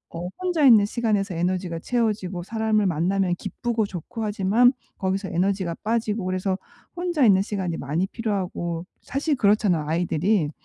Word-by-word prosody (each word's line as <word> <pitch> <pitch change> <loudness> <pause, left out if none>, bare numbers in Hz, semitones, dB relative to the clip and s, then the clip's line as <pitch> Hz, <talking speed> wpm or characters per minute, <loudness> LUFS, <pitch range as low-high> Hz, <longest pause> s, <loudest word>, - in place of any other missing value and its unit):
어 175 +1 -4
혼자 355 -4 +1
있는 220 -6 +7
시간에서 210 -3 0
에너지가 175 0 -1
채워지고 205 -5 -1
사람을 220 +1 +1
만나면 180 +2 +1
기쁘고 230 +4 -2
좋고 200 +5 -6
하지만 215 +3 +3 0.3
거기서 190 0 -1
에너지가 190 0 0
빠지고 220 -2 -1
그래서 185 +1 -1 0.4
혼자 345 -6 +1
있는 195 -3 +5
시간이 190 -5 -3
많이 150 +7 -1
필요하고 185 -6 -3 0.2
사실 285 +3 -1
그렇잖아요 200 -8 +2
I들이. 170 +2 +1
195 Hz, 380 characters per minute, -24 LUFS, 180-220 Hz, 0.4 s, 있는